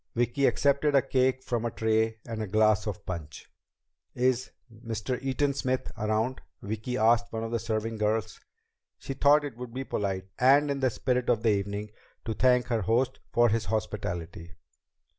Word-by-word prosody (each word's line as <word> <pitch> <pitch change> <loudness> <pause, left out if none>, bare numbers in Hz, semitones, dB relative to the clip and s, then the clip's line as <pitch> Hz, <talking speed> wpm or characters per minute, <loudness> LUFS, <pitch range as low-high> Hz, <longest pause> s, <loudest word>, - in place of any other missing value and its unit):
Vicki 120 +4 +2
accepted 140 +1 +2
a 135 - +6
cake 130 -1 +1
from 120 -2 -2
a 120 - 0
tray 110 0 0
and 115 -2 -5
a 110 - -3
glass 110 +1 +3
of 105 0 -5
punch. 80 -5 -7 0.7
"Is 125 0 +1 0.2
Mr. 115 +2 -4
Eaton 135 +2 0
Smith 130 -1 -2
around?" 110 +4 -1 0.2
Vicki 110 +4 -4
asked 120 +1 +3
one 115 0 -3
of 115 - -4
the 115 - 0
serving 110 0 -3
girls. 110 0 -1 0.6
She 135 - -6
thought 145 +2 +4
it 130 -5 -7
would 125 -1 -8
be 135 - -2
polite, 95 -6 -2
and 140 +3 +5
in 140 - -2
the 130 -1 +2
spirit 125 +1 -1
of 115 -2 +2
the 115 - +4
evening, 100 +1 -2 0.3
to 110 - -2
thank 125 +1 +3
her 115 -3 +1
host 120 +6 +1
for 120 0 +4
his 110 0 0
hospitality. 85 -5 -4
115 Hz, 175 wpm, -28 LUFS, 110-130 Hz, 0.7 s, a